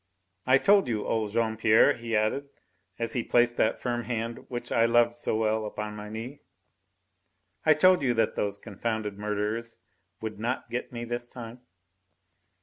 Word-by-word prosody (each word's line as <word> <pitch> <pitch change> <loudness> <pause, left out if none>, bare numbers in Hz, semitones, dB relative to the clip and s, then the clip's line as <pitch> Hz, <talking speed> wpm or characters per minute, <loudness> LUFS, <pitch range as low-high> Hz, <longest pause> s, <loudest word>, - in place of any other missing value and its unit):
"I 130 +1 +6
told 200 +6 +4
you, 110 -3 -2
old 110 -2 0
Jean 110 +1 0
Pierre," 110 0 +5
he 115 -1 -4
added, 125 +7 0 0.5
as 115 -1 -2
he 125 - 0
placed 120 0 +2
that 110 - +2
firm 120 -1 -2
hand 115 -1 -4
which 120 -1 -5
I 115 - +4
loved 120 0 +4
so 120 -2 -2
well 110 0 +1
upon 105 0 -5
my 105 0 -7
knee, 115 +6 -7 1.3
"I 155 - +7
told 185 0 +5
you 125 -3 +1
that 115 - +1
those 100 -1 -1
confounded 105 -1 -4
murderers 105 +2 -2 0.4
would 110 -2 -6
not 120 +4 -3
get 125 - -3
me 120 -1 -5
this 120 0 -4
time." 120 0 -9
115 Hz, 165 wpm, -28 LUFS, 110-120 Hz, 1.3 s, I